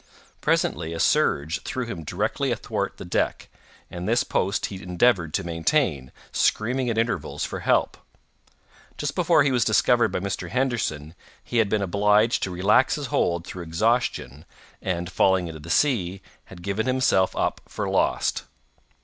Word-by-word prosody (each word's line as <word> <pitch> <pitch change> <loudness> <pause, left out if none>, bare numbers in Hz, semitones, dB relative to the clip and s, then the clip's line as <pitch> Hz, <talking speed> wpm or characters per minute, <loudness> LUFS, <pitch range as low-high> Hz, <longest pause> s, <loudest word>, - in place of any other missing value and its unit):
Presently 80 +1 0
a 85 - -5
surge 80 +4 +1
threw 130 -1 -4
him 100 -8 -6
directly - - -1
athwart - - -3
the - - -8
deck, - - -1 0.4
and 90 +3 -4
this 120 +2 +3
post 100 +5 0
he 95 -2 -7
endeavored 90 -1 +2
to - - -1
maintain, 80 - 0 0.2
screaming 125 +3 +1
at 115 - -1
intervals 115 -8 -1
for - - -5
help. - - +1 1.0
Just 150 -1 -2
before 170 -4 +3
he 140 - +2
was 125 -2 +2
discovered 120 +2 +3
by - - -1
Mr. 90 -2 -4
Henderson, 110 - -1 0.3
he 120 - -3
had 110 -3 +3
been 105 -1 +1
obliged 105 +4 +2
to - - -1
relax 95 +8 +3
his 145 - -4
hold 85 0 +1
through 90 - -7
exhaustion, 85 - -1 0.4
and, 90 -1 -3
falling 95 -1 +2
into 80 -1 -8
the 80 +3 -11
sea, 95 - +1 0.2
had 85 -2 -13
given 100 +5 -2
himself 130 -7 +2
up - - -1
for - - -3
lost. - - 0
100 Hz, 160 wpm, -24 LUFS, 85-120 Hz, 1.0 s, this